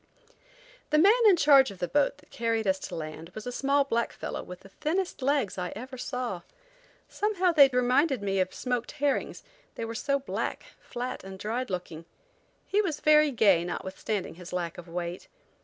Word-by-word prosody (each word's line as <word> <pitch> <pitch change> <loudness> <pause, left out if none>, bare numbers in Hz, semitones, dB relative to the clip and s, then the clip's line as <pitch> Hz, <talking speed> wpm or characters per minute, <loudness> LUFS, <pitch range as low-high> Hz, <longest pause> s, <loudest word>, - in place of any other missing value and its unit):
The 305 - +3
man 390 +7 +7 0.2
in 385 - +6
charge 280 -6 +6
of 200 - -10
the 175 - -2
boat 285 +3 +1
that 290 - -23
carried 230 -1 -1
us 190 -1 +1
to - - -6
land 155 +1 -7
was 215 - -7
a 245 - -3
small 280 +3 +2
black 235 -4 -1
fellow - - -5
with 180 0 -10
the 195 - -15
thinnest 345 - -2
legs 265 -8 0
I 180 0 -3
ever 255 +5 -7
saw. 250 -7 -4 0.7
Somehow 385 -4 +1
they 290 -4 +8
reminded 260 +2 +2
me 195 -1 0
of 185 0 +1
smoked 245 -2 -3
herrings, 290 -1 -1 0.3
they 230 - -4
were 225 - -5
so 275 +4 0
black, 275 - -4
flat 250 +1 -5
and 190 0 -9
dried 230 +6 -3
looking. 175 -3 -5 0.6
He 415 - +2
was 335 -8 -2
very 305 -1 +5
gay 205 -9 +4
notwithstanding 190 +3 -4
his 180 +1 -11
lack 175 -2 -3
of 175 - -11
weight. 175 +1 -5
245 Hz, 185 wpm, -28 LUFS, 190-285 Hz, 0.7 s, they